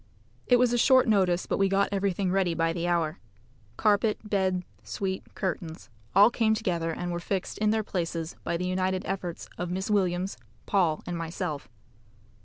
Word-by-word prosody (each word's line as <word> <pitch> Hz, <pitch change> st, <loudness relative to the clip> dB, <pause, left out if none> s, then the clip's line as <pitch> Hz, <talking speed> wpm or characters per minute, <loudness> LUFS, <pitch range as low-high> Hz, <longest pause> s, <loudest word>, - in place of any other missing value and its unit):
It 245 Hz, -, +6 dB
was 245 Hz, -1 st, +3 dB
a 240 Hz, -, +2 dB
short 260 Hz, 0 st, +5 dB
notice, 185 Hz, -5 st, +2 dB
but -, -, -1 dB
we 195 Hz, 0 st, +3 dB
got 195 Hz, +1 st, +2 dB
everything 195 Hz, -1 st, 0 dB
ready 185 Hz, -3 st, +1 dB
by 165 Hz, 0 st, +1 dB
the 170 Hz, 0 st, -2 dB
hour. 170 Hz, -2 st, 0 dB, 0.6 s
Carpet, 210 Hz, 0 st, +3 dB
bed, 190 Hz, -3 st, +1 dB, 0.2 s
suite, 190 Hz, -1 st, -3 dB
curtains 170 Hz, -4 st, -4 dB, 0.3 s
all 205 Hz, +4 st, +7 dB
came 220 Hz, -2 st, +2 dB
together, 175 Hz, -6 st, -1 dB
and 175 Hz, +2 st, -3 dB
were 175 Hz, -, -2 dB
fixed 190 Hz, +2 st, -3 dB
in 215 Hz, 0 st, +2 dB
their 220 Hz, 0 st, +1 dB
places 165 Hz, -4 st, -3 dB
by 170 Hz, -, -1 dB
the 180 Hz, -, -3 dB
united 185 Hz, +1 st, 0 dB
efforts 180 Hz, -3 st, -4 dB
of 175 Hz, 0 st, -2 dB
Miss 190 Hz, +4 st, -2 dB
Williams, 185 Hz, -2 st, 0 dB, 0.3 s
Paul, 175 Hz, -7 st, +1 dB
and 175 Hz, -, -4 dB
myself. 165 Hz, -4 st, -4 dB
185 Hz, 175 wpm, -28 LUFS, 175-200 Hz, 0.6 s, all